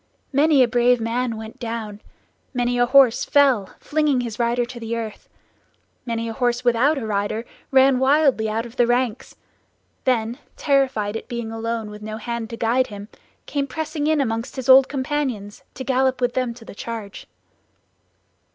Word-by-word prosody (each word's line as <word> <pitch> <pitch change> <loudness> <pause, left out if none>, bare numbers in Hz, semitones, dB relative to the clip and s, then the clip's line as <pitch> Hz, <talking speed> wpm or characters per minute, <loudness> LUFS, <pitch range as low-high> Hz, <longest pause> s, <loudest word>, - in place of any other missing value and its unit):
Many 285 -1 +5
a - - +3
brave 245 0 +3
man 230 +1 -1
went 220 0 -9
down, 225 -3 -5 0.5
many 245 0 0
a 245 - +4
horse 260 -2 +5
fell, 265 -9 +3
flinging 295 -4 +1
his 230 -2 -6
rider 240 +1 +1
to 240 0 -9
the 230 0 -3
earth; 225 -2 -7 0.8
many 230 0 -2
a 225 - -4
horse 245 0 -1
without 250 +6 +3
a 250 - -3
rider 210 +2 -2 0.2
ran 265 -1 +5
wildly 265 -5 +3
out 225 +2 -2
of 235 +1 -12
the 240 - +4
ranks; 245 -1 -1 0.7
then 240 -1 0 0.2
terrified 265 -8 +1
at 225 - -6
being 235 -2 -5
alone, 225 -1 -3
with 210 0 -10
no 215 0 -6
hand 235 0 -4
to 230 - -7
guide 245 +3 +1
him, 205 0 -9 0.4
came 280 -1 -2
pressing 310 +1 -3
in 310 -1 +2
among 225 -4 0
his 260 -3 -6
old 265 0 +7
companions, 260 -7 -3
to 260 - -5
gallop 260 0 +1
with 245 -1 0
them 250 -2 -1
to 230 -2 -14
the - - -10
charge. 215 -1 -7
240 Hz, 170 wpm, -22 LUFS, 225-265 Hz, 0.8 s, old